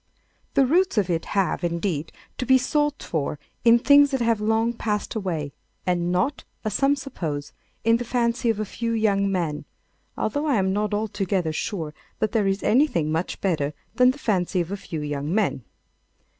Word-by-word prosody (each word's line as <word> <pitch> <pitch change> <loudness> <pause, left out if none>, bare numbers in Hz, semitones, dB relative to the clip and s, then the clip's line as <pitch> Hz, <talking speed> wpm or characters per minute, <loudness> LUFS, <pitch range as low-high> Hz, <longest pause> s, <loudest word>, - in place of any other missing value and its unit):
The 275 - +5
roots 350 +2 +2
of 195 -3 +2
it 165 -1 -1
have, 185 -2 +1
indeed, 170 -2 -1 0.3
to 255 - -2
be 260 - +7
sought 295 +3 0
for 150 -2 -2 0.3
in 235 0 +7
things 285 +3 +6
that 265 -1 -1
have 230 -2 +2
long 225 +2 +1
passed 210 -3 -2
away, 165 -9 -3 0.3
and 175 -1 0
not, 190 +10 0 0.2
as 215 - -1
some 275 +5 +3
suppose, 165 - -5 0.3
in 230 +1 +4
the 245 - -3
fancy 240 0 0
of 220 -2 +1
a 215 - -1
few 230 +3 -3
young 200 -3 +2
men—although 185 - -4
I 285 - +3
am 190 -2 +1
not 210 +1 0
altogether 195 -5 -1
sure 160 -3 -3 0.2
that 215 - 0
there 215 -4 +2
is 195 +1 0
anything 215 - +2
much 165 +3 -2
better 150 -6 0 0.2
than 250 0 +5
the 260 - -1
fancy 190 -8 0
of 175 +1 -2
a - - -1
few 165 -5 -6
young 145 0 -3
men. 195 - 0
205 Hz, 180 wpm, -24 LUFS, 175-235 Hz, 0.3 s, be